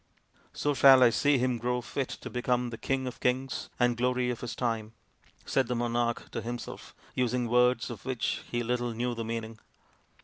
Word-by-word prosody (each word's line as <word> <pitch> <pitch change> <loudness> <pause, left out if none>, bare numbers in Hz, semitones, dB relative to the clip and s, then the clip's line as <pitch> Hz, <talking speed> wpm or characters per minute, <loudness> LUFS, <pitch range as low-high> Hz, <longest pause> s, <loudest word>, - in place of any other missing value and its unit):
" - - -33
So 145 - 0
shall 135 -2 +8
I 120 - +6
see 145 +3 +3
him 125 -1 0
grow 125 +1 0
fit 125 +2 -3
to - - -6
become 125 0 0
the 115 - -6
king 135 -1 -1
of 125 - -6
kings 130 0 -1
and 120 -1 +3
glory 125 +1 +1
of 120 - -6
his 120 - -5
time," 115 -3 -2 0.5
said 135 -3 +1
the 125 - -1
monarch 120 0 -1
to - - -3
himself, 120 +2 -7 0.2
using 125 -1 0
words 125 0 +3
of 110 -4 -8
which 130 -3 -2
he 120 0 -1
little 120 0 -1
knew 120 +1 -1
the 115 -1 -4
meaning. 115 -1 -5
125 Hz, 195 wpm, -29 LUFS, 120-125 Hz, 0.5 s, shall